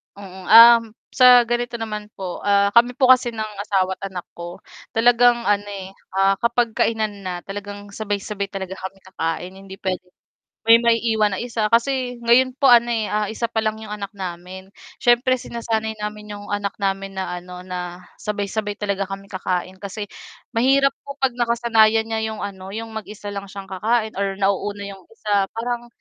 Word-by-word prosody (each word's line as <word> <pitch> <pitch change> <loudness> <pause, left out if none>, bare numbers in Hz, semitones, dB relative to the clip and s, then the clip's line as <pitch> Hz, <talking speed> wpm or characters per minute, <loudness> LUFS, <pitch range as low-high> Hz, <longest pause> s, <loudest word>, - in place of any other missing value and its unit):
Oo, 190 -2 -11
ah, 230 +2 +10 0.3
sa 250 -1 +7
ganito 240 +1 -2
naman 215 -2 -5
po 185 -2 -5
ah, 200 0 +3
kami 240 +2 +4
po 255 -1 +3
kasi 250 -2 +4
ng 215 -1 -4
asawa 190 -2 0
at 195 - -4
anak 180 -2 -5
ko 175 0 -8 0.3
talagang 240 +1 +4
ano, 205 -1 +1
eh, 195 -2 -7 0.2
ah, 195 0 +3
kapag 235 0 +1
kainan 215 -3 -1
na 185 - -2
talagang 205 0 -8
sabay-sabay 205 -1 -3
talaga 190 -1 -6
kami 190 +1 -7
kakain 180 0 -4
hindi 195 0 -10
pwedeng 185 -1 -4 0.5
may 230 - +9
maiiwan 225 -3 +2
na 190 - -3
isa 230 -2 -2
kasi 245 +1 +1
ngayon 240 +2 +4
po 275 - +4
ano 240 0 +6 0.4
isa 230 +1 -2
pa 230 - -6
lang 215 0 -1
'yong 220 -1 -9
anak 200 -2 -6
namin 185 0 -7 0.3
siyempre 245 +1 +4
sinasanay 225 -2 -3
namin 210 0 -6
'yong 205 0 -9
anak 205 -1 -2
namin 195 -1 -2
na 185 -2 -3
ano 180 0 -10
na 180 -1 -6 0.2
sabay-sabay 205 0 -3
talaga 200 -2 -2
kami 195 0 -6
kakain 185 0 -3
kasi 205 +1 -6 0.5
mahirap 270 +4 +4 0.2
po 280 - -6
pag 265 -2 +1
nakasanayan 230 -2 +3
niya 225 0 -2
yung 220 -1 -6
ano 190 -2 -7
yung 225 0 -6
mag-isa 210 -1 -7
lang 200 0 -6
siyang 195 0 -8
kakain 220 +3 0
or 195 -1 -1
nauuna 200 +1 -1
'yong 195 -2 -9
isa 205 -3 0
parang, 240 +1 -3
210 Hz, 170 wpm, -22 LUFS, 195-235 Hz, 0.5 s, ah